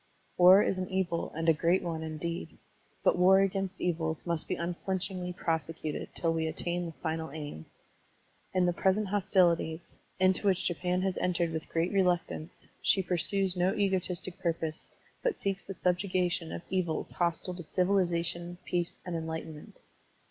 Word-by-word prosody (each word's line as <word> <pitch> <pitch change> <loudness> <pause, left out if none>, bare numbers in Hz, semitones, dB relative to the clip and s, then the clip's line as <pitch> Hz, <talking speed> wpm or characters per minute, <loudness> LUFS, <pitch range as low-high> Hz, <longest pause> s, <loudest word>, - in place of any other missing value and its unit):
War 185 +3 +8
is 185 - 0
an 185 - -3
evil 185 -3 -1
and 165 +1 -2
a 165 - +7
great 170 +4 +2
one, 165 -2 -3
indeed. 160 +2 -5 0.5
But - - +3
war 190 +2 +7
against 195 -1 -1
evils 160 -2 -1
must 170 -2 -1
be - - -1
tmflinchingly 180 +1 -3
prose 165 -2 -1
cuted 155 -2 -4
till 165 -1 +1
we 160 -1 0
attain 175 +2 -2
the - - -5
final 160 -1 -2
aim. 145 - -7 0.8
In 185 -1 +2
the 175 - +2
present 190 +3 +1
hostilities, 175 -4 +2 0.2
into 185 +2 +3
which 185 -2 +2
Japan 180 +1 0
has 190 -1 0
entered 170 -2 +1
with 160 -1 -4
great 165 +2 0
reluctance, 180 -3 0 0.2
she 190 - +4
pursues 185 +2 0
no 180 +1 +2
egotistic 185 -2 -1
purpose, 165 -3 -2 0.3
but - - +1
seeks 195 -1 -3
the 195 - -5
subjugation 180 -2 0
of - - -5
evils 180 -4 -1
hostile 175 +1 -1
to 175 - -6
civili 185 +3 +2
zation, 175 0 -2
peace, 175 -1 -2
and 175 -2 -3
enlightenment. 160 -1 -6
175 Hz, 160 wpm, -30 LUFS, 165-185 Hz, 0.8 s, War